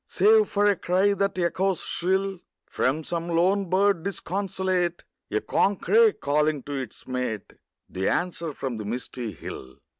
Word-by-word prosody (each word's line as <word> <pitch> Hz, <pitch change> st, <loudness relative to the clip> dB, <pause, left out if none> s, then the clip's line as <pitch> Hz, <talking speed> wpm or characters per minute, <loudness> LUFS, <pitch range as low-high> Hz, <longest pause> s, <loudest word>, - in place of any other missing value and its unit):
Save 435 Hz, 0 st, +4 dB
for 205 Hz, 0 st, +2 dB
a 205 Hz, -1 st, +4 dB
cry 190 Hz, +3 st, +2 dB
that 200 Hz, -1 st, -1 dB
echoes 185 Hz, +1 st, 0 dB
shrill 190 Hz, +1 st, -1 dB, 0.3 s
From 150 Hz, +5 st, 0 dB
some 170 Hz, +1 st, -3 dB
lone 185 Hz, +3 st, +2 dB
bird 195 Hz, -1 st, +3 dB
disconsolate; 185 Hz, -1 st, -2 dB, 0.3 s
A -, -, 0 dB
corncrake 425 Hz, -, +3 dB
calling 150 Hz, -1 st, +1 dB
to 145 Hz, -, -6 dB
its 135 Hz, -2 st, -6 dB
mate; 125 Hz, -5 st, -3 dB, 0.3 s
The 95 Hz, +1 st, -1 dB
answer 170 Hz, -2 st, -1 dB
from 135 Hz, -4 st, -4 dB
the 105 Hz, -, -5 dB
misty 120 Hz, +1 st, -4 dB
hill. 65 Hz, -6 st, -9 dB
175 Hz, 145 wpm, -26 LUFS, 140-195 Hz, 0.3 s, Save